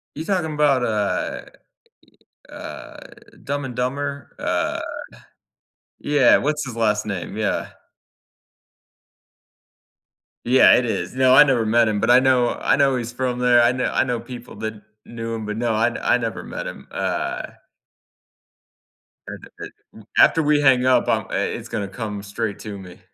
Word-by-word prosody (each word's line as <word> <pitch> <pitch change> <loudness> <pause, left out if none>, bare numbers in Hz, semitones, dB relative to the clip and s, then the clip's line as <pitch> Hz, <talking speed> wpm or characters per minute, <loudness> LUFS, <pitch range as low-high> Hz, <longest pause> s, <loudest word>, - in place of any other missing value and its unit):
You 155 - -5
talking 175 -5 -1
about, 145 -4 +2
uh 105 -4 -2 1.1
uh - - -9 0.5
Dumb 140 0 -3
and 125 -2 -7
Dumber? 140 +2 -3
Uh - - -1 1.2
yeah, 145 -3 +4
what's 150 0 -1
his 125 -3 -7
last 105 -2 0
name? 100 -5 -5
Yeah. - - -2 2.7
Yeah, 130 +2 +6
it 125 - +1
is. 120 - -3
No, 130 0 +4
I 150 - +10
never 130 -6 +1
met 115 +1 +3
him, 105 -1 0
but 110 - +3
I 125 - +7
know 130 -2 +2
I - - +3
know 135 -1 +2
he's 120 -1 -5
from 125 0 -2
there. 125 -1 +5
I 120 - +4
know 125 0 -2
I - - +1
know 125 -3 -2
people 125 0 -10
that 110 -1 -6 0.2
knew 115 -1 -6
him, 110 -1 -5
but, 105 0 -4
no, 120 0 0
I 120 +2 +1
I - - +3
never 115 -2 -4
met - - -6
him. - - -9
Uh - - -3 1.8
And - - -9
a - - -13
a - - -14 0.2
after 165 - +5
we 150 0 +2
hang 130 -3 +4
up, 130 0 +3
I'm - - +1
I - - -2 0.2
it's - - -9
gonna 100 - -3
come 105 0 -6
straight 105 +1 -4
to 105 -2 -7
me. 90 -2 -12
120 Hz, 160 wpm, -21 LUFS, 110-135 Hz, 2.7 s, I